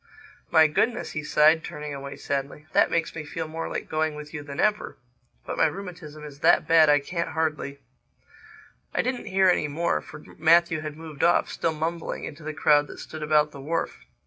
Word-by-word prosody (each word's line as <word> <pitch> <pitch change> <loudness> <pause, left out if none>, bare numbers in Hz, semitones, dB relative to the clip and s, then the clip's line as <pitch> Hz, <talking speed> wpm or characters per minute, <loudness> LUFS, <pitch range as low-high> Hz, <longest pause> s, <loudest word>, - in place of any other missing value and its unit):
"My 160 -1 +6
Goodness," 220 +10 0
he 150 - -4
sighed, 155 +2 +4
turning 150 -1 -6
away 140 0 -7
sadly. 140 +2 -4
"That - - +4
makes 165 -1 -1
me 160 - -5
feel 160 +1 -5
more 165 +1 -5
like - - -4
going 155 -1 -1
with 150 +1 -9
you 150 - -5
than 140 -1 -8
ever—But 125 - -3
my - - +5
rheumatism 175 -6 -8
is 145 -2 -10
that - - +4
bad 160 -2 +6
I 145 0 +6
can't 170 +4 -3
hardly—" 155 -3 -2 1.2
I - - +2
didn't 255 0 -3
hear 190 0 +3
any 175 -4 +3
more 165 +4 0
for 150 - -11 0.2
Matthew 165 0 +4
had 155 -1 -6
moved 160 -3 -7
off, 170 - +3
still 165 - -1
mumbling, 165 +2 -3
into 155 +2 -7
the 155 +1 -4
crowd 150 -1 +3
that - - -10
stood 155 - -8
about 150 0 +3
the 140 - -10
wharf. 165 +4 -2
155 Hz, 195 wpm, -25 LUFS, 150-165 Hz, 1.2 s, My